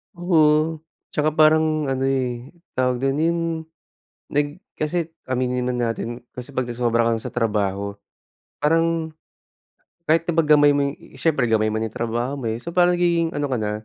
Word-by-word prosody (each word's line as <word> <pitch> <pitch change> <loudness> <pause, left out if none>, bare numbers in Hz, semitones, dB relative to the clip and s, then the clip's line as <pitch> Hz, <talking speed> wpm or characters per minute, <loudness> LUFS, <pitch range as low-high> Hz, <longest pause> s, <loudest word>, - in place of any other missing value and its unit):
Oo, 160 -2 +3 0.3
tsaka 150 0 0
parang 155 -1 +3
ano, 135 0 0
eh, 130 0 -2 0.2
tawag 125 -1 +1
dun 135 +1 +1
'yun, 170 +2 +1 0.9
nag, 145 +5 -1 0.2
kasi, 165 +2 -1 0.2
aminin 125 -1 -1
man 125 -1 -1
natin 120 +1 -3
kasi, 125 +2 -10
pag 130 - +1
nasobrahan 115 -1 +1
ka - - -8
sa - - -7
trabaho, 100 -3 -1 0.6
parang 165 +1 +1 0.9
kahit 165 +1 +2
na 170 - 0
pag 160 -2 +2
gamay 145 -1 +6
mo, 140 - +2
eh, - - -14
siyempre 135 -2 +1
gamay 110 -1 +2
mo 110 - -1
na 110 - -1
yung 110 - -10
trabaho 120 +3 -2
mo, 125 -5 -3
eh, 110 - -3
so, 170 +8 -8
parang 175 -1 +4
nagiging 170 -2 +2
ano 145 - 0
ka 130 - -2
na, 105 -3 -1
135 Hz, 175 wpm, -22 LUFS, 120-160 Hz, 0.9 s, gamay